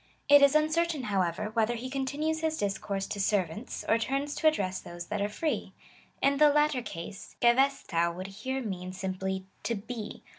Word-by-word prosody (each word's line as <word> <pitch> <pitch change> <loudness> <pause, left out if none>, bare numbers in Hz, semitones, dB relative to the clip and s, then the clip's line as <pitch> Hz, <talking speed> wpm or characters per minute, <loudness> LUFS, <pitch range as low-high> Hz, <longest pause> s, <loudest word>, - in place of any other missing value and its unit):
"' - - -40
It 285 - +9
is 280 +1 +6
uncertain, 310 -1 +2
however, 195 -1 -1
whether 230 +1 +2
he 240 +3 -5
continues 285 +4 -1
his 320 -1 -1
discourse 195 0 -2
to 205 - -5
sen^ants, 195 +2 -1
or 225 - +3
turns 275 +5 -1
to 315 - +2
address 190 -12 +1
those 175 0 -8
that 210 -1 -1
are 205 - 0
free. 305 +9 -2 0.5
In 275 0 +4
the 300 +1 +7
latter 295 -2 +3
case, 170 -3 -8
jeveaOac 235 -9 +3
would 185 +1 -6
here 255 +7 -4
mean 185 -4 -5
simply 190 0 -3 0.2
to 235 - -1
be. 220 +1 -7
225 Hz, 180 wpm, -29 LUFS, 190-280 Hz, 0.5 s, It